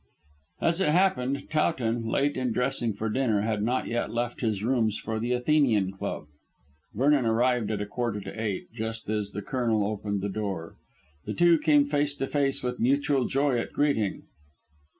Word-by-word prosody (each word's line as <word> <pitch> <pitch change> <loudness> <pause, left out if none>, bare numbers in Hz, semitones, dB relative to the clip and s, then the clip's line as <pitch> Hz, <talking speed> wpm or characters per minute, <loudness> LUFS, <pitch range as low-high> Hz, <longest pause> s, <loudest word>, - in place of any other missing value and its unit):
As 170 +2 +2
it 170 - +3
happened, 140 -6 +1
Towton, 120 -7 0
late 140 +5 +1
in 130 -2 -1
dressing 125 -1 0
for 105 +2 -4
dinner, 110 -2 +1
had 110 -1 -1
not 125 +4 0
yet 120 0 -2
left 120 +1 -3
his 110 -4 -1
rooms 115 -3 +1
for 110 -1 -4
the 120 +2 -2
Athenian 125 -6 +2
Club. 95 -5 -5 0.7
Vernon 140 +3 +3
arrived 120 0 +2
at 105 -2 -2
a - - -2
quarter 115 0 -2
to 95 0 -7
eight, 105 -4 -3
just 115 -1 -5
as 105 -2 -1
the 105 0 -6
Colonel 115 -3 0
opened 100 -1 -2
the 100 - -1
door. 95 -5 -4 0.5
The - - -4
two 170 -2 +5
came 145 -2 +4
face 145 0 0
to 135 - -2
face 140 -1 0
with 125 0 -3
mutual 140 +1 +2
joy 135 -2 +1
at - - -6
meeting. 125 -9 +1
120 Hz, 175 wpm, -27 LUFS, 110-140 Hz, 0.7 s, two